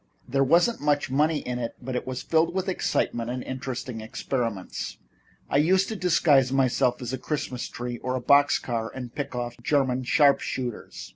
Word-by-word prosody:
There 135 +2 +2
wasn't 175 - +3
much 145 -2 +1
money 150 +2 +2
in 125 0 -4
it, 115 -1 -4
but 130 +1 -5
it 125 - -3
was 130 -1 -4
filled 165 +2 +2
with 190 0 -1
excitement 120 -9 -1
and 125 +1 -3
interesting 130 -3 -5
experiments. 115 -4 -3 0.5
I - - +1
used 185 +6 +3
to 220 - -3
disguise 155 -8 +3
myself 130 -1 +2
as 120 +1 -4
a 130 - -3
Christmas 130 -4 -3
tree 120 -1 -5
or 130 0 -2
a - - -1
box 140 +3 +5
car 115 -2 -3
and 125 -2 -7
pick 140 -3 -4
off 120 0 -4
German 130 -1 +1
sharp 140 +1 +5
shooters. 120 - -5
130 Hz, 185 wpm, -26 LUFS, 125-145 Hz, 0.5 s, box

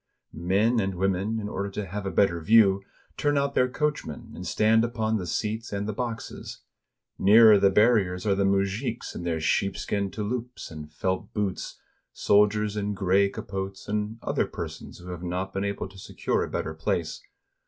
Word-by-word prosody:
Men 100 +8 +2
and 95 -2 -1
women, 95 +4 0
in 105 - -4
order 100 -1 -3
to 100 +1 -4
have 100 +1 -5
a - - -2
better 85 -2 +2
view, 100 0 +5 0.4
turn 145 -1 +1
out 140 0 +1
their 125 -1 +3
coachmen, 145 - -3
and 90 - -7
stand 110 +8 +3
upon 110 -2 0
the 90 -4 -5
seats 110 +7 -2
and 100 0 -2
the 110 - -2
boxes. 115 0 -6 0.6
Nearer 110 +1 +7
the 100 0 +5
bar 105 +5 +5
riers 90 -4 0
are 100 - +3
the 100 0 +1
mujiks 100 +5 -1
in - - -6
their 85 -2 -1
sheepskin 100 +4 0
touloupes 115 +3 -5
and 75 -1 -9
felt 95 +4 -2
boots, 100 -3 -3 0.3
soldiers 105 +1 +3
in 105 0 -2
gray 100 +1 +3
capotes, 95 0 -6
and 105 +1 -2
other - - 0
persons - - -7
who 90 +1 -9
have 90 -1 -6
not 90 +2 -3
been 95 - -1
able 100 -1 -3
to 95 0 -14
secure - - -1
a - - -5
better 80 - -3
place. 80 0 -2
100 Hz, 180 wpm, -26 LUFS, 95-110 Hz, 0.6 s, Nearer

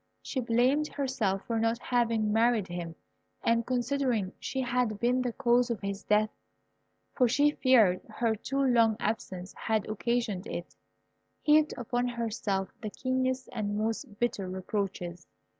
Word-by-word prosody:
She 265 - -3
blamed 250 +5 +2
herself 245 -10 -1
for 230 -1 -1
not 225 +1 +1
having 230 -4 +1
married 225 -3 +3
him, 175 -1 -5 0.5
and 230 0 +2
considering 250 -5 0
she 265 - -3
had 245 -4 0
been 245 +2 +2
the 250 -1 -1
cause 240 +2 +2
of 235 - -2
his 200 0 -3
death 215 +1 +2 0.8
(for 250 - +3
she 290 +5 +3
feared 230 -11 +4
her 225 +1 0
too 270 +6 -1
long 230 -4 +4
absence 190 -4 -3
had 220 -2 -1
occasioned 220 -2 -1
it), 175 - -6 0.7
heaped 300 0 +4
upon 245 +1 -1
herself 220 -5 -2
the 215 - -3
keenest 255 +2 -1
and 205 -3 -2
most 220 +1 -2
bitter 205 -6 -1
reproaches. 185 -2 -4
230 Hz, 140 wpm, -29 LUFS, 205-250 Hz, 0.8 s, feared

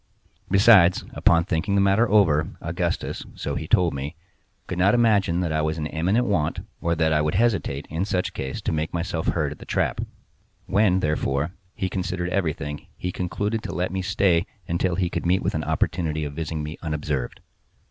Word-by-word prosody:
Besides, 95 -3 +6
upon 85 -1 +4
thinking 95 +4 0
the - - +4
matter 100 +4 +3
over, 85 -8 +4
Augustus, 85 +1 -2
so - - -4
he 80 - -4
told 90 0 +3
me, 70 +4 -5 0.5
could 90 - -4
not 100 +5 +4
imagine 100 -7 +3
that 85 -3 -1
I 80 0 +1
was 80 +1 -1
in 75 - -3
immediate 90 +10 +1
want, 100 -10 0 0.2
or 85 0 +1
that 80 -1 +2
I 75 - +3
would 75 +2 0
hesitate, 100 -10 +1
in 80 +3 -1
such 95 -2 -1
case, 65 0 -4
to - - -1
make 80 +2 -2
myself 85 -1 -2
heard 75 -4 0
at 75 - -9
the - - -9
trap. - - 0 0.6
When, 95 -2 +3
therefore, 75 0 0 0.2
he 95 - -1
considered 90 -1 -2
everything 75 -6 -2
he 90 - -3
concluded 100 +5 -2
to - - -6
let 90 +2 -1
me 95 0 -2
stay 95 -2 +2 0.2
until 85 +1 0
he 90 -1 +1
could - - -2
meet 95 +2 +2
with - - 0
an - - -1
opportunity 80 -3 -1
of 70 - -5
visiting 80 0 -3
me 75 +2 -6
unobserved. 75 -5 -3
85 Hz, 190 wpm, -24 LUFS, 80-95 Hz, 0.6 s, Besides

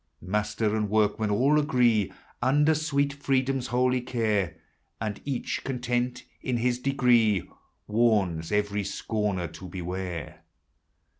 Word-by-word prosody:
Master 105 +3 -1
and 105 -1 0
workmen 105 0 +2
all 135 +9 +3
agree, 120 -9 +2 0.3
Under 150 +4 +4
sweet 145 -2 0
Freedom's 135 -2 0
holy 125 +1 +2
care, 110 -8 0 0.4
And 105 -2 -4
each 135 -3 -2
content 125 -1 -2 0.2
in 125 -2 -1
his 120 +1 +1
degree, 120 -7 +3 0.4
Warns 105 -8 +1
every 105 0 0
scorner 100 -2 -2
to 90 +3 -10
beware. 90 -2 -5
115 Hz, 115 wpm, -27 LUFS, 105-125 Hz, 0.4 s, Under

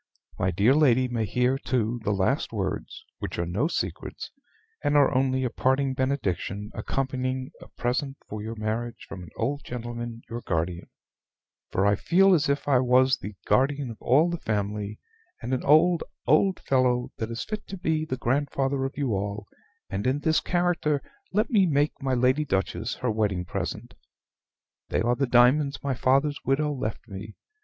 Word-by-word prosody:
"My 90 - +2
dear 100 +8 +4
lady 130 -4 +4
may 120 -3 -1
hear, 125 +5 +1
too, 120 -2 -1
the - - -1
last 105 +8 +1
words, 95 -4 -4
which - - -5
are 85 - 0
no 100 - 0
secrets, - - -4 0.5
and 145 - +3
are 145 - +5
only 130 0 +2
a 125 - 0
parting 130 +3 +1
benediction 105 - -2
accompanying 130 -1 -2
a - - -11
present 135 +3 -2
for 105 0 -6
your 110 +2 -5
marriage 110 +2 -3
from 95 - -8
an 90 - -10
old 140 +5 -2
gentleman 120 -1 -6
your 115 +1 -5
guardian; 85 -1 -2 0.8
for 95 - +1
I 100 - +5
feel 190 - +4
as 160 -4 +2
if 140 0 0
I 135 -3 +4
was 130 +1 +4
the 100 +1 -7
guardian 140 -1 +2
of 110 - -12
all 150 +8 +4
the 170 - -3
family, 105 -2 -2 0.4
and 125 - -3
an 130 - -1
old 165 +3 +5 0.2
old 185 +4 +3
fellow 125 -2 +1
that 110 - -3
is 115 0 -4
fit 215 -1 -6
to 195 - -6
be 160 -3 0
the 130 -4 -3
grandfather 135 +1 0
of 135 - -5
you 140 -4 0
all; 100 +1 -2 0.4
and 100 +5 -2
in 135 +3 +1
this 160 +1 +3
character 175 -5 0 0.3
let 215 +5 +1
me 200 -5 +5
make 145 -1 +2
my 135 -1 0
Lady 130 +4 +3
Duchess 110 -1 -1
her 125 -3 -1
wedding 100 -5 0
present. - - -4 1.0
They - - +1
are 120 +2 +2
the 135 +1 0
diamonds 130 +4 +4
my 140 -1 0
father's 135 +4 +2
widow 150 +2 +1
left 115 -5 -4
me. 105 +1 -8
130 Hz, 175 wpm, -26 LUFS, 110-140 Hz, 1.0 s, are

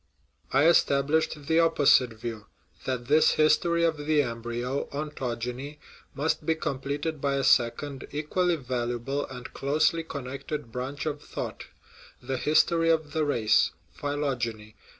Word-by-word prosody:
I 135 +3 +4
established 150 -1 +2
the 160 +2 +3
opposite 145 -7 +4
view, 110 -2 -7 0.4
that 125 -2 -2
this 150 +4 +4
his 155 0 +5
tory 170 +1 0
of 165 -2 +2
the 150 0 +2
embryo 120 +2 -3
(ontogeny) 135 -1 -4 0.4
must 150 +3 0
be 160 - +1
completed 145 +1 -3
by 140 -1 +1
a 135 - 0
second, 130 +4 +1
equally 170 +4 0
valuable, 125 0 -3
and 125 -2 -9
closely 155 +4 +1
connected 140 -3 -6
branch 130 +5 -4
of 150 -1 -3
thought - - -6 0.5
the 135 - -3
history 165 +4 +3
of 155 -3 +1
the 160 - +1
race 120 -7 +2 0.2
(phylogeny). 120 -7 -3
140 Hz, 130 wpm, -27 LUFS, 125-155 Hz, 0.5 s, his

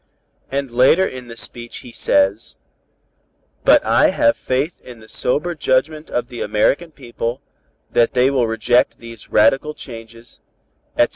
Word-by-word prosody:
And 135 -2 -2
later 130 +10 +4
in 125 -1 -8
the 115 0 -10
speech 120 0 -9
he 120 - -10
says: 100 -1 0 1.1
'But - - +5
I - - +4
have 115 - +2
faith 135 +6 -2
in 120 -2 -12
the 110 - -15
sober 150 +10 -1
judgment 150 +1 0
of 120 0 -2
the 120 - -7
American 120 +11 +1
people, 120 -3 -5 0.5
that 115 - +2
they 125 +2 +3
will 125 -4 +1
reject 120 +2 +1
these 115 -2 -12
radical 135 +8 +3
changes, 115 -1 -12 0.6
etc.' - - +4
125 Hz, 145 wpm, -19 LUFS, 115-135 Hz, 1.1 s, But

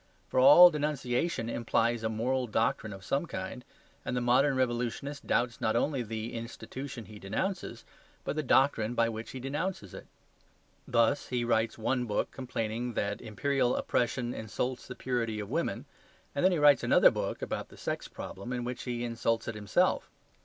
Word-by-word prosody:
For - - +1
all 150 +7 +10
denunciation 145 -3 -1
implies 115 0 0
a 110 - -1
moral 125 +3 0
doctrine 110 0 0
of 95 -1 -9
some 140 - 0
kind; 125 - -6 0.4
and 125 - -2
the - - +2
modern 130 +3 +3
revolutionist 130 +3 -2
doubts 120 0 0
not 110 0 +1
only 135 +2 +1
the 110 0 -5
institution 120 +1 -7
he 105 -1 -11
denounces, 185 - -3 0.4
but - - -3
the 155 - 0
doctrine 125 -4 +2
by 115 -1 +3
which 110 0 -6
he 130 - -7
denounces 140 - -3
it. - - -10 0.8
Thus 115 +3 +2
he 125 -1 -1
writes 115 -1 +1
one 125 +2 0
book 105 -3 -1
complaining 120 -2 -3
that 100 0 -1
imperial 130 +3 0
oppression 120 0 0
insults 125 +4 -4
the 125 - -7
purity 115 -4 -2
of 105 - -6
women, - - -1 0.5
and 140 - -1
then 185 - +5
he 175 - +1
writes 145 -2 +6
another - - +6
book - - -3
(about - - -4
the - - -15
sex - - -3
problem) 100 +6 -8
in 125 -1 -2
which 125 +1 -4
he 120 -1 -3
insults 115 -1 -1
it 115 - -2
himself. 105 -2 +1
120 Hz, 175 wpm, -30 LUFS, 115-135 Hz, 0.8 s, all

